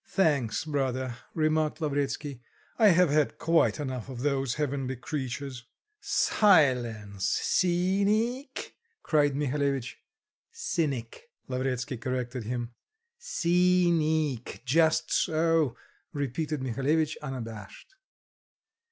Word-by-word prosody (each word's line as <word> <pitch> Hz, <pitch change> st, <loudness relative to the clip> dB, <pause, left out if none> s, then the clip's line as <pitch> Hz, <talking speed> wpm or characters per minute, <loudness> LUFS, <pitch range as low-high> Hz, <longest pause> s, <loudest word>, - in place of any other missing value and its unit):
"Thanks, 145 Hz, -, +1 dB
brother," 130 Hz, -4 st, -2 dB, 0.2 s
remarked 155 Hz, -1 st, +1 dB
Lavretsky. 145 Hz, -3 st, -2 dB, 0.4 s
"I 220 Hz, -, +7 dB
have 180 Hz, -4 st, +5 dB
had 150 Hz, 0 st, +2 dB
quite 165 Hz, -1 st, +2 dB
enough 130 Hz, -4 st, -4 dB
of 125 Hz, -2 st, -6 dB
those 135 Hz, -3 st, 0 dB
heavenly 135 Hz, -3 st, -2 dB
creatures." 130 Hz, -1 st, -5 dB, 0.3 s
"Silence, 120 Hz, -, +2 dB, 0.2 s
ceeneec!" 200 Hz, +9 st, +1 dB, 0.3 s
cried 145 Hz, -3 st, +2 dB
Mihalevitch. 140 Hz, -3 st, -1 dB, 0.5 s
"Cynic," 165 Hz, -, -3 dB, 0.2 s
Lavretsky 130 Hz, 0 st, -2 dB
corrected 125 Hz, -1 st, -3 dB
him. 120 Hz, 0 st, -3 dB, 0.5 s
"Ceeneec, 170 Hz, -, +1 dB
just 160 Hz, +4 st, +2 dB
so," 160 Hz, -5 st, +2 dB, 0.4 s
repeated 145 Hz, +1 st, -2 dB
Mihalevitch 145 Hz, +5 st, 0 dB
unabashed. 120 Hz, -, -8 dB
145 Hz, 85 wpm, -28 LUFS, 130-165 Hz, 0.5 s, I